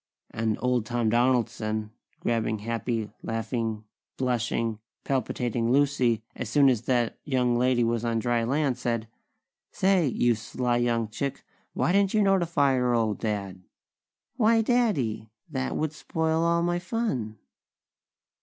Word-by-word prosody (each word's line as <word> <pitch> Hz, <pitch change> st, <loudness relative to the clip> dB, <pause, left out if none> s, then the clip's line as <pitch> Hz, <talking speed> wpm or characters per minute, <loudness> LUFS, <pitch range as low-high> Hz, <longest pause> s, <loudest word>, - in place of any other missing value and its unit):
And 110 Hz, -1 st, -1 dB
Old 125 Hz, -3 st, +1 dB
Tom 120 Hz, -2 st, 0 dB
Donaldson, 110 Hz, -3 st, +1 dB, 0.3 s
grabbing 115 Hz, -2 st, 0 dB
happy, 115 Hz, 0 st, -3 dB
laughing, 115 Hz, -1 st, -3 dB, 0.3 s
blushing, 115 Hz, -3 st, -1 dB, 0.2 s
palpitating 120 Hz, -3 st, -1 dB
Lucy 130 Hz, -5 st, +2 dB
as 125 Hz, -, -5 dB
soon 140 Hz, +2 st, +5 dB
as 120 Hz, -4 st, +1 dB
that 120 Hz, -3 st, 0 dB
young 125 Hz, -4 st, +1 dB
lady 125 Hz, 0 st, +2 dB
was 115 Hz, 0 st, 0 dB
on 115 Hz, -1 st, 0 dB
dry 120 Hz, 0 st, +1 dB
land, 135 Hz, +1 st, 0 dB
said: 115 Hz, -3 st, -2 dB, 0.6 s
"Say! 190 Hz, -4 st, +2 dB
You 120 Hz, -1 st, +2 dB
sly 120 Hz, +2 st, -1 dB
young 120 Hz, -2 st, +1 dB
chick! 135 Hz, +5 st, -4 dB, 0.3 s
Why -, -, +1 dB
didn't 200 Hz, +1 st, +2 dB
you 215 Hz, -, +4 dB
notify 170 Hz, -8 st, +3 dB
your 125 Hz, -1 st, +2 dB
old 110 Hz, -2 st, 0 dB
Dad?" 100 Hz, -4 st, -3 dB, 0.8 s
"Why, 225 Hz, -1 st, +4 dB
Daddy! 190 Hz, -, +1 dB, 0.2 s
That 135 Hz, -5 st, -3 dB
would 155 Hz, -1 st, -1 dB
spoil 160 Hz, +1 st, -1 dB
all 170 Hz, 0 st, +2 dB
my 175 Hz, 0 st, 0 dB
fun!" 175 Hz, -, -2 dB
120 Hz, 135 wpm, -27 LUFS, 115-145 Hz, 0.8 s, soon